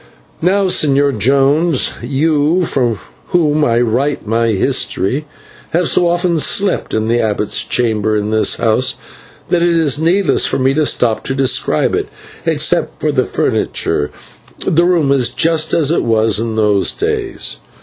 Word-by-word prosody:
Now, 195 +4 +2
Señor 140 - +1
Jones, 140 - +2
you, 150 +6 +1
for 120 -7 -1 0.3
whom 155 -3 +1
I 115 -3 +2
write 125 +4 -1
my 115 +2 0
history, 125 +7 -1 0.5
have 170 0 +1
so 175 - +3
often 175 -1 0
slept 195 +5 0
in 110 0 -1
the 120 +1 +1
abbot's 105 -2 -1
chamber 110 -3 0
in 105 +1 -2
this 110 0 +2
house 115 +3 0 0.5
that 175 - +1
it 170 -1 +2
is 150 -2 +1
needless 170 -1 +2
for - - -1
me 135 0 +1
to 155 +1 +1
stop 115 -3 0
to 135 - -2
describe 130 -1 0
it. - - -1 0.4
Except - - 0
for - - 0
the - - 0
furniture, 75 - -1 0.6
the 170 +2 +2
room 170 -6 +2
is 130 -4 +2
just 160 +1 +1
as 160 -3 +1
it 170 - +1
was 110 -2 +1
in 115 -1 -3
those 105 -3 +2
days. 425 -3 -3
140 Hz, 155 wpm, -15 LUFS, 115-165 Hz, 0.6 s, so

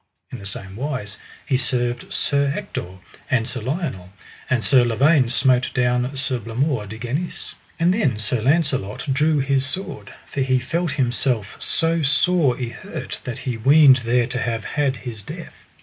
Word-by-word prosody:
In - - -6
the 100 - -7
same 100 0 -7
wise 125 -7 -4 0.3
he 135 -3 +2
served 120 -2 -1
Sir 140 -1 +1
Ector 95 - -5 0.3
and 120 -3 +1
Sir 125 -1 -4
Lionel; 130 - -3 0.4
and 125 -4 +1
Sir 130 -3 +5
Lavaine 130 +3 +3
smote 130 0 +3
down 125 +2 +1
Sir 130 -2 -1
Blamore 115 +1 -1
de 110 +3 -7
Ganis. 130 +10 -4 0.3
And 170 +2 +4
then 140 - +1
Sir 110 +2 -1
Launcelot 135 - 0
drew 150 +3 +2
his 135 0 +2
sword, 160 +8 -4
for 140 - -4
he 130 -1 +2
felt 160 +5 -1
himself 125 -5 0
so 165 0 +1
sore 150 -1 +3
y 125 -3 -4
hurt - - -7
that 125 -3 -4
he 125 -3 -2
weened 135 +3 +7
there 120 0 +1
to 125 +1 -3
have 115 -3 -2
had 140 0 0
his 115 -4 -4
death. - - -10
130 Hz, 165 wpm, -22 LUFS, 120-145 Hz, 0.4 s, weened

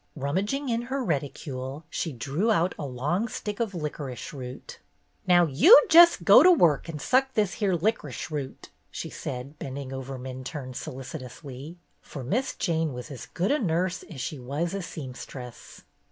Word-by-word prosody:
Rummaging 195 - -1
in 230 0 0
her 270 0 -1
reticule, 140 - -4
she 165 - -2
drew 140 - -1
out 180 -3 +2
a 145 - -3
long 150 - -1
stick 210 -1 -5
of 220 -5 -2
licorice 145 -6 -5
root. 130 -2 -8 0.5
"Now 175 -1 +6
you 170 - +8
jes' 340 +1 +9
go - - +7
to 365 - +7
work 170 - +3
and 155 -2 -5
suck 265 - +2
this 210 -3 +1
here 195 -3 +2
lic'rish 165 - -2
root," 140 -3 -5 0.2
she - - -6
said, 135 +4 -6
bending 135 0 -6
over 135 0 -5
Minturne 130 +1 -6
solicitously, 135 +4 -8 0.2
for 140 - -8
Miss 240 - -1
Jane 160 -5 0
was 125 +3 -8
as 130 - -8
good 185 +4 -1
a 295 - +2
nurse 180 -2 0
as 150 - -9
she 140 +2 -4
was 145 +8 -3
a 195 - -2
seamstress. 130 -5 -9
150 Hz, 165 wpm, -27 LUFS, 130-190 Hz, 0.5 s, jes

